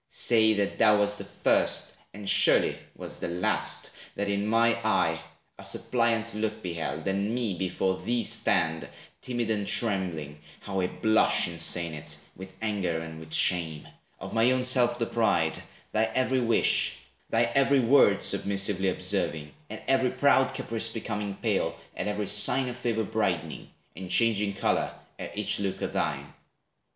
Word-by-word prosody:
Say, 110 -2 +4
that 100 -1 -2
thou 105 -2 +6
wast 105 0 +1
the - - -5
first— - - 0 0.2
And 100 0 -10
surely - - +5 0.2
wast - - -6
the - - -2
last—that 90 +3 -2
in 100 +1 -1
my 115 +1 +3
eye 80 -7 +1 0.4
A - - -9
suppliant 115 -2 -1
look 110 0 -3
beheld, 85 0 -4
and 100 +4 -1
me 120 -5 -1
before 95 +1 -2
Thee 120 0 -1
stand, 80 0 +1 0.3
timid 120 -3 -2
and 105 -2 -1
trembling 90 -9 -1 0.2
(how 95 -1 -4
I 90 - 0
blush, 110 +3 +2
In 85 -1 -7
saying 85 0 0
it, 75 - -4 0.2
with 95 +1 -11
anger 100 -6 -1
and 80 -1 -8
with 80 0 -12
shame), 80 -3 +1 0.3
Of - - -8
my 115 +2 +3
own 130 0 +1
self 125 -1 +4
deprived, 110 -9 0 0.3
thy 110 +1 +2
every 130 +3 0
wish, 115 -1 +1 0.3
Thy 115 +1 +2
every 140 0 +3
word 120 -4 +4
submissively 100 -1 0
observing, 75 -4 -2 0.2
At - - -8
every 130 -1 +2
proud 135 0 +2
caprice 115 0 -2
becoming 105 -3 -4
pale, - - -1 0.2
At - - -3
every 105 0 -2
sign 105 +6 +2
of 120 - -6
favor 115 -2 -1
brightening, - - -2 0.3
And 95 +2 -8
changing 105 -1 +2
color - - -1 0.2
at - - -8
each 105 -1 -1
look 100 -2 -3
of - - -3
thine. - - -3
105 Hz, 155 wpm, -27 LUFS, 95-115 Hz, 0.4 s, thou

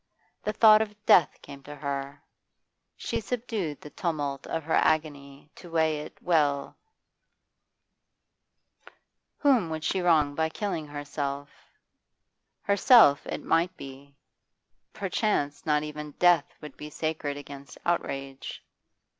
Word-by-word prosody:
The 210 - -2
thought 215 -1 +7
of 210 -1 -3
death 170 - +5
came 140 - -11
to 145 +2 -10
her; 140 0 -5 0.7
she - - -3
subdued 215 - -3
the 150 - -11
tumult 145 -5 -3
of 165 - -3
her 160 - -3
agony 145 -2 0
to 175 - -12
weigh 160 -2 +1
it 150 - -9
well 145 -5 +1 2.6
Whom 255 - +3
would 160 -1 -4
she 190 - 0
wrong 155 -5 +3
by 160 +2 0
killing 165 -5 -4
herself? 145 -1 -5 1.1
Herself, 200 - +6
it - - -5
might 170 +3 +1
be; 140 +1 -11 0.8
perchance 190 -8 -1
not 150 -1 +2
even 150 -1 -7
death 175 -3 +3
would 150 -3 -10
be 150 - -8
sacred 150 -2 -3
against 140 -1 -11
outrage. 135 -5 -3
150 Hz, 120 wpm, -27 LUFS, 145-175 Hz, 2.6 s, thought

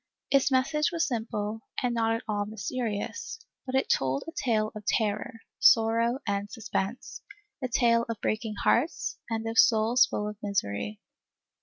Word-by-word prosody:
Its 275 0 +4
message 280 +4 +2
was 335 -1 +1
simple 220 -3 -3 0.2
and 245 -1 +1
not 225 -1 +1
at 230 - -5
all 205 -1 -1
mysterious, 220 - -4 0.3
but 260 - -2
it 265 - +2
told 135 0 +1
a - - -5
tale 220 -8 0
of 215 - -8
terror, 220 +2 -1 0.2
sorrow 230 +2 +4
and 200 0 -2
suspense, 225 0 -4 0.4
a - - +1
tale 235 -1 +3
of 230 - -3
breaking 215 0 -2
hearts 280 +8 +1
and 225 0 -2
of 225 0 +1
souls 230 +3 +5
full 210 - -3
of 210 0 -6
misery. 105 - -2
225 Hz, 155 wpm, -28 LUFS, 210-245 Hz, 0.4 s, souls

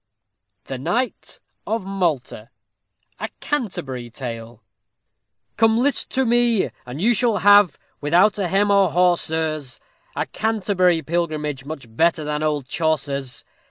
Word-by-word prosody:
THE 130 - -6
KNIGHT 245 - -2 0.3
OF 220 -3 -2
MALTA 160 - -2 0.7
A - - -3
Canterbury 140 - -3
Tale 115 -2 -7 0.9
Come 225 0 +4
list 275 +4 +1
to 265 0 +2
me, 235 -3 +2 0.2
and 125 +4 -7
you 230 +7 +3
shall 230 -1 +1
have, 205 -6 +5 0.2
without 180 +8 +3
a 190 - 0
hem 200 +3 +2
or 200 -2 +4
haw, 180 +1 +4
sirs, 155 -5 -3 0.4
A - - -1
Canterbury 185 -6 +1
pilgrimage, 155 -5 -2
much 150 -3 -7
better 165 +2 +2
than 150 0 -2
old 150 -4 -1
Chaucer's. 140 -4 -2
170 Hz, 125 wpm, -22 LUFS, 140-205 Hz, 0.9 s, have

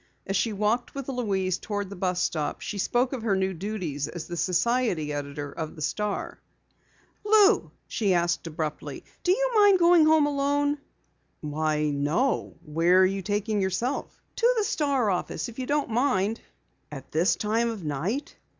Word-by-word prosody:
As 195 - -2
she 225 +3 +1
walked 215 +6 -1
with 275 -1 -5
Louise 195 -8 -1
toward 205 -2 -4
the - - -6
bus 180 -1 -1
stop 155 -2 -1
she 205 - -5
spoke 245 +6 +1
of 255 - -3
her 215 -3 +1
new 190 0 0
duties 170 -6 -3
as 160 0 -7 0.2
society 185 -5 +1
editor 145 0 -5
of 155 +2 -6
the 155 - -10
Star. 210 - -2 0.8
"Lou," 420 0 +5 0.2
she 200 -6 +1
asked 175 0 0
abruptly, 155 -1 -5 0.2
"do 360 - +2
you - - +2
mind 410 -3 +6
going 340 -2 +6
home 310 -1 +5
alone?" 285 0 +1 0.6
"Why, 150 0 0
no. 150 - 0
Where 165 +4 +3
are - - +6
you 195 +1 -1
taking 205 +1 -1
yourself?" 195 +9 -2 0.2
"To 485 +1 +4
the 435 - +2
Star 280 - +1
office, 180 +6 -3
if 235 - -10
you 255 - -3
don't 290 -4 0
mind." 230 -3 +1 0.5
"At 135 -2 -9
this 165 +5 +2
time 225 +2 0
of 220 -5 -5
night?" 165 - -3
205 Hz, 165 wpm, -26 LUFS, 170-270 Hz, 0.8 s, mind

